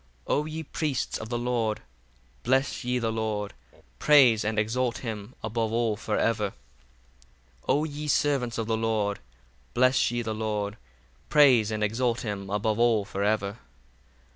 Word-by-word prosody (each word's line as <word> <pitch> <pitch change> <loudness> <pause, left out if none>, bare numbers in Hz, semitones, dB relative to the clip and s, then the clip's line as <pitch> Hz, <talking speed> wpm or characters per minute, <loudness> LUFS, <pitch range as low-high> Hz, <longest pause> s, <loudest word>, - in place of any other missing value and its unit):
62 - - 0
O 150 - +1
ye 155 +1 -5
priests 145 -3 -2
of 110 - -7
the 120 - -1
Lord, 120 -3 -1 0.6
bless 130 +2 +1
ye 125 +1 0
the 115 -2 -1
Lord: 110 -2 -2 0.5
praise 130 -7 +6
and 110 0 -2
exalt 115 +3 0
him 110 +1 -6
above 110 0 -1
all 115 -2 +1
for 105 +1 -2
ever. 105 -3 0 1.1
63 - - -28
O 150 - +3
ye 150 -1 -5
servants 135 -5 +1
of 115 - -1
the 110 0 0
Lord, 110 -2 0 0.6
bless 130 +2 +4
ye 120 0 -2
the 110 -1 -3
Lord: 105 -1 -2 0.5
praise 130 -8 +5
and 110 -1 -2
exalt 115 +3 0
him 100 -3 -4
above 105 +2 0
all 115 -4 +3
for 100 - -5
ever. 105 0 0
115 Hz, 160 wpm, -27 LUFS, 105-125 Hz, 1.1 s, praise